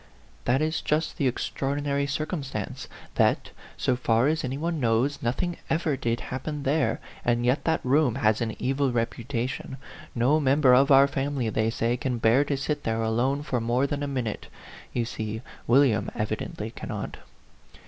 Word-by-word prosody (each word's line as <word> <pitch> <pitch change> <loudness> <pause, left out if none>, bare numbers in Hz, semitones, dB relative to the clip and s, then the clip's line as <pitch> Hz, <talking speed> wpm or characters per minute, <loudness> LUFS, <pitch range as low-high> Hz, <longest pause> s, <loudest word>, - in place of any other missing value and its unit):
"That 135 +5 +2
is 160 +1 -1
just 155 +1 0
the 140 - +3
extraordinary 140 +3 -1
circumstance, 140 - -4 0.3
that, - - +2 0.3
so 130 - +1
far 120 0 +2
as 160 0 0
any 130 +1 -2
one 165 +1 -2
knows, 125 +3 +1
nothing 170 +9 -1
ever 160 -2 +1
did 120 -1 -1
happen 145 +2 -4
there; 145 +2 +1 0.2
and 120 0 +1
yet 125 +4 +1
that 160 -4 +1
room 135 -2 +3
has 110 -4 +2
an 110 -2 -2
evil 135 0 0
reputation. 120 +2 -3 0.4
No 130 +6 +3
member 135 -2 +4
of 135 +3 +5
our 135 0 +7
family, 135 -3 -1
they 110 +1 +1
say, 115 +1 0
can 125 -1 -2
bear 115 +5 +4
to 140 -1 -1
sit 145 +2 -2
there 115 0 0
alone 125 +6 +1
for 125 -5 -1
more 120 +4 +1
than 145 +1 -2
a 145 - -1
minute. 125 -6 -3 0.4
You 120 - -1
see, 110 -1 -5 0.2
William 125 -2 +4
evidently 110 0 -3
cannot." - - -6
130 Hz, 165 wpm, -26 LUFS, 120-145 Hz, 0.4 s, our